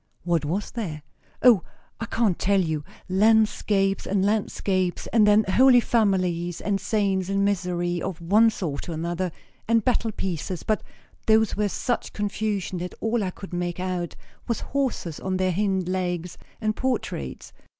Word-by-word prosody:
"What 170 Hz, -3 st, +1 dB
was 185 Hz, +7 st, -2 dB
there?" 165 Hz, -11 st, -5 dB, 0.4 s
"O, 240 Hz, -7 st, +7 dB, 0.4 s
I 230 Hz, -, -4 dB
can't 225 Hz, -7 st, +1 dB
tell 200 Hz, 0 st, +3 dB
you. 160 Hz, -4 st, -1 dB, 0.2 s
Landscapes 205 Hz, -1 st, +2 dB
and 195 Hz, -1 st, +1 dB
landscapes; 195 Hz, -3 st, 0 dB
and 220 Hz, -3 st, +5 dB
then 210 Hz, +1 st, +6 dB
Holy 245 Hz, +6 st, +6 dB
Families; 185 Hz, -7 st, +1 dB
and 200 Hz, -2 st, -1 dB
saints 195 Hz, -4 st, 0 dB
in 195 Hz, 0 st, +1 dB
misery, 175 Hz, -3 st, 0 dB
of 185 Hz, -3 st, -4 dB
one 210 Hz, +7 st, +5 dB
sort 170 Hz, -7 st, -4 dB
or -, -, -2 dB
another; 170 Hz, +3 st, -2 dB, 0.4 s
and 230 Hz, -1 st, +3 dB
battle 235 Hz, -2 st, +1 dB
pieces, 180 Hz, -2 st, -4 dB
but 215 Hz, -, 0 dB, 0.5 s
those 220 Hz, 0 st, +4 dB
were 210 Hz, 0 st, +1 dB
such 245 Hz, +4 st, -2 dB
confusion 205 Hz, -3 st, -2 dB
that 180 Hz, 0 st, -5 dB
all 225 Hz, 0 st, 0 dB
I 190 Hz, -, -1 dB
could 190 Hz, +1 st, -10 dB
make 175 Hz, 0 st, -2 dB
out 180 Hz, -2 st, -3 dB, 0.3 s
was 235 Hz, -, -1 dB
horses 260 Hz, -, -2 dB
on 185 Hz, 0 st, -2 dB
their 185 Hz, 0 st, +1 dB
hind 190 Hz, -1 st, 0 dB
legs; 180 Hz, -2 st, -2 dB, 0.2 s
and 215 Hz, -1 st, 0 dB
portraits. 220 Hz, -, -3 dB
195 Hz, 155 wpm, -25 LUFS, 175-215 Hz, 0.5 s, O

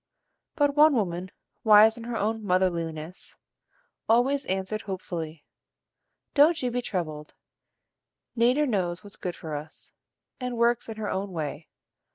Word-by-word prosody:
But 290 Hz, -3 st, +2 dB
one 300 Hz, -1 st, +6 dB
woman 185 Hz, -4 st, -1 dB, 0.3 s
wise 220 Hz, 0 st, +7 dB
in 230 Hz, -1 st, -9 dB
her 235 Hz, -1 st, -3 dB
own 220 Hz, +2 st, -1 dB
motherliness 175 Hz, -3 st, -2 dB, 0.7 s
always 265 Hz, +5 st, +3 dB
answered 190 Hz, +3 st, -2 dB
hopefully: 170 Hz, -6 st, -6 dB, 0.9 s
"Don't 315 Hz, +3 st, +5 dB
you 250 Hz, -, 0 dB
be 245 Hz, +1 st, -1 dB
troubled; 155 Hz, -9 st, -4 dB, 1.0 s
Nater 250 Hz, +5 st, +3 dB
knows 185 Hz, -7 st, -1 dB
what's 205 Hz, -1 st, -9 dB
good 180 Hz, -1 st, -5 dB
for 155 Hz, -2 st, -6 dB
us, 150 Hz, +2 st, -10 dB, 0.5 s
and 250 Hz, -2 st, -4 dB
works 235 Hz, 0 st, +2 dB
in 220 Hz, -, -6 dB
her 215 Hz, -1 st, -3 dB
own 195 Hz, +1 st, -3 dB
way. 155 Hz, -1 st, -4 dB
205 Hz, 135 wpm, -27 LUFS, 175-240 Hz, 1.0 s, wise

